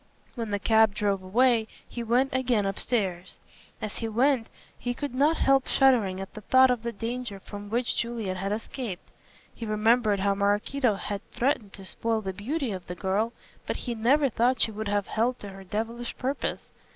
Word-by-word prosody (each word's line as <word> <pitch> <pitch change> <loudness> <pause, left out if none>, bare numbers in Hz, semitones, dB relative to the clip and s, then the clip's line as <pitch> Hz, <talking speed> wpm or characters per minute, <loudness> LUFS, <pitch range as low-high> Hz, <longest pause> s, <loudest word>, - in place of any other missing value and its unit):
When 230 -3 -4
the 205 - 0
cab 220 0 +4
drove 200 -2 0
away 225 +4 +3 0.2
he 240 - -6
went 245 +4 +2
again 250 -5 +1
upstairs. 195 -3 -1 0.4
As 215 - -5
he 225 - -2
went 240 +2 +2 0.3
he 245 0 -2
could 285 -1 -4
not 290 +5 +3
help 270 -1 +3
shuddering 230 -9 +3
at 195 - -7
the 215 - -8
thought 260 +4 +5
of 245 -2 0
the 235 +1 -3
danger 230 -1 -4
from 205 +1 -9
which 240 +3 0
Juliet 230 -5 -2
had 195 +2 -2
escaped. 215 -2 -5 0.4
He - - -9
remembered 215 -1 +2
how 200 0 +3
Maraquito 205 +4 +1
had 200 0 -4
threatened 235 -6 -1
to 195 - -10
spoil 225 +3 -1
the 190 -2 -4
beauty 255 - -2
of 185 -2 -6
the 180 - -5
girl, 195 +6 0 0.4
but - - -1
he 245 - -1
never 265 +6 +3
thought 245 0 +2
she 225 - +3
would 215 0 -4
have 205 -1 +1
held 240 +3 0
to 205 - -8
her 195 0 -10
devilish 230 +5 -4
purpose. 265 +2 -3
225 Hz, 190 wpm, -27 LUFS, 200-250 Hz, 0.4 s, thought